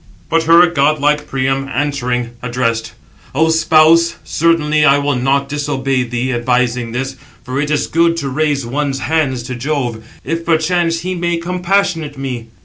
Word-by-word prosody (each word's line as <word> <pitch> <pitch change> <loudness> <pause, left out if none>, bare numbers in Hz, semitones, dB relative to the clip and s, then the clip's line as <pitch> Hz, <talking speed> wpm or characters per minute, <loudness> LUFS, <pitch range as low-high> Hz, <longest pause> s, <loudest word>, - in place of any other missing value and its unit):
But 165 - +3
her 170 +2 +7
godlike 150 -2 +1
Priam 135 +1 -1
answering, 125 -4 -2
addressed: 115 -2 -2 0.4
"O 160 +3 +3
spouse, 160 +1 +4
certainly 155 -2 +1
I 140 -1 +5
will 145 -1 0
not 135 +2 +1
disobey 135 -2 -1
thee, 125 +1 -2
advising 120 -1 0
this; 135 +2 -4 0.3
for 130 +2 -3
it 150 - -2
is 150 -1 +1
good 165 +1 +1
to 145 -4 -3
raise 145 -1 0
one's 135 +2 -2
hands 145 -6 0
to 125 +1 -6
Jove, 125 -3 -3 0.2
if 165 0 -3
perchance 165 +1 +1
he 185 +1 -3
may 175 -1 -1
compassionate 175 -3 -1
me." 125 -4 -5
145 Hz, 150 wpm, -16 LUFS, 130-165 Hz, 0.4 s, her